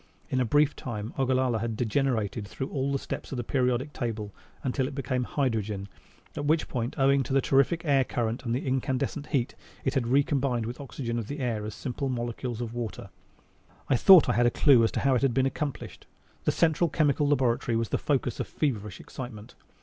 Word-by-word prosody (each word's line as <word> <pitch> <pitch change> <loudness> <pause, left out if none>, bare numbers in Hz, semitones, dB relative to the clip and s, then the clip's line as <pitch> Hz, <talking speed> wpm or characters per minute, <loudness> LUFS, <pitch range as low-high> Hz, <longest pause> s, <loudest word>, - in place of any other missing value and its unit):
In 130 - +1
a - - +2
brief 145 +4 +3
time 110 -2 -5
Ogallala 130 -3 +2
had 115 0 -3
degenerated 115 -4 0
through 135 +6 -5
all 140 0 -1
the 140 - +1
steps - - -6
of 135 - -3
the 120 - -2
periodic 125 +3 0
table 110 -4 -4 0.3
until 130 0 0
it 140 - -7
became 130 -2 -1
hydrogen, 110 -8 -1 0.5
at 145 - -3
which 155 +2 +2
point, 120 -1 -3
owing 135 0 +4
to 135 - -5
the 135 - +5
terrific 140 +6 +2
air 140 -3 +4
current 120 0 -2
and 115 -2 -1
incandescent 130 +2 -1
heat, 130 -5 0 0.3
it 135 - +1
had 130 -5 0
recombined 135 -2 +1
with 120 +2 -5
the - - -7
oxygen 120 -2 -4
of 110 - -5
the 145 - -5
air 120 -6 -2
as 105 - -6
simple 135 +1 -3
molecules 120 -1 -3
of 115 -1 -4
water. 120 -4 -5 0.8
I 135 - +4
thought 180 +5 +8
I - - +2
had 120 +3 +3
a - - +5
clue 125 -1 +5
as 115 - +2
to - - -1
how 135 -1 +3
it 125 - +2
had 135 -4 +1
been 130 0 +3
accomplished. 140 +1 -4 0.4
The - - +3
Central 165 +1 +2
Chemical 145 -2 +2
Laboratory 125 -4 +1
was 115 -1 0
the - - 0
focus 130 -4 -1
of - - -2
feverish 105 - -2
excitement. 115 -4 -9
130 Hz, 205 wpm, -28 LUFS, 115-140 Hz, 0.8 s, thought